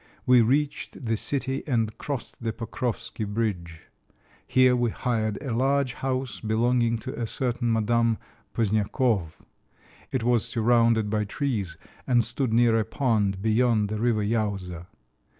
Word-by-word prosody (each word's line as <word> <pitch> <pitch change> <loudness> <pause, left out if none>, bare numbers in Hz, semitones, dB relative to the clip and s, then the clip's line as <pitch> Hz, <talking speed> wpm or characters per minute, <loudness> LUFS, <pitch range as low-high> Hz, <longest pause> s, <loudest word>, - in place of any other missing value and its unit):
We 125 -1 +6
reached 140 +4 0
the 115 -1 0
city 135 +3 -1
and 115 -5 0
crossed 140 -5 -5
the 115 -1 -1
Pokròvski 115 0 -4
bridge. 90 -7 -3 0.7
Here 130 0 +4
we 120 -1 +1
hired 110 -3 -1
a 130 -5 -3
large 135 0 +1
house 130 -3 -3
belonging 115 +1 +1
to 130 +3 -6
a 115 - -1
certain 120 0 -1
Madame 115 0 +2 0.4
Pozniakòv; 105 -4 +1 0.8
it 130 -3 -1
was 120 -2 +3
surrounded 115 -2 +2
by 105 -1 0
trees 105 - -2 0.3
and 120 -2 +4
stood 125 +1 -1
near 115 0 +4
a - - +1
pond 105 -7 0
beyond 110 -1 +2
the 105 0 -3
river 115 -2 +1
Iowza. 100 -5 -2
115 Hz, 135 wpm, -26 LUFS, 110-125 Hz, 0.8 s, We